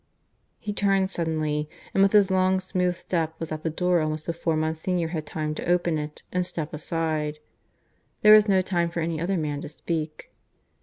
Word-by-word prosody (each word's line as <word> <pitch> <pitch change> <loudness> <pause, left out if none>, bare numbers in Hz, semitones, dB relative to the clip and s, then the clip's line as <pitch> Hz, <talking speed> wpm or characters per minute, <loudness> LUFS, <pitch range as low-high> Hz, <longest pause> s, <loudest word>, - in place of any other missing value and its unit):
He 210 - -5
turned 195 -1 +2
suddenly, 155 -3 -1 0.2
and 195 - +3
with 195 0 +5
his 200 -2 +5
long 185 0 +3
smooth 180 -1 0
step 165 -2 -2
was 165 -1 -5
at 155 0 -3
the 160 - -1
door 180 +1 +1
almost 155 0 -2
before 165 -1 -1
Monsignor 160 +2 -1
had 155 -3 -4
time 155 0 -3
to 155 - -5
open 175 -3 +2
it 150 0 -7
and 180 0 +1
step 160 -3 -4
aside. 155 -1 -2 0.9
There 215 0 +9
was 215 0 +7
no 190 -1 +4
time 175 -2 0
for 170 0 -3
any 165 -1 -2
other 185 +2 0
man 150 -3 -2
to 150 - -6
speak. 155 -1 -4
165 Hz, 190 wpm, -26 LUFS, 155-185 Hz, 0.9 s, There